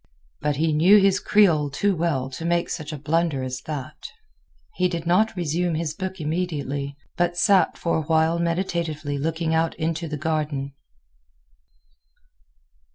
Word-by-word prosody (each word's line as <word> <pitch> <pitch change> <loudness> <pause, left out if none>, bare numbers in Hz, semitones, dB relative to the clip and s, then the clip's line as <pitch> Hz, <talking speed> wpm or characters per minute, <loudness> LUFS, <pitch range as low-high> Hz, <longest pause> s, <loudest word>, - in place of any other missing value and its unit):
but 150 0 0
he 155 +2 +1
knew 175 +7 +6
his 195 0 +3
Creole 175 -9 +3
too 195 +7 0
well 155 -6 0
to 150 - -7
make 170 0 0
such 155 -3 -5
a 150 - -5
blunder 150 -1 0
as 130 0 -4
that. 145 -4 -6 0.7
He 185 - +1
did 170 -1 -4
not 195 +6 +2
resume 175 0 -1
his 155 -1 -2
book 190 +1 -5
immediately, 145 -4 -3 0.2
but 175 0 0
sat 195 +1 +3
for 170 - 0
a - - 0
while 160 +2 +2
meditatively 165 -4 -2
looking 160 +2 -1
out 160 0 +1
into 165 0 -2
the 150 -1 -4
garden. 150 -3 -2
160 Hz, 150 wpm, -24 LUFS, 150-175 Hz, 0.7 s, knew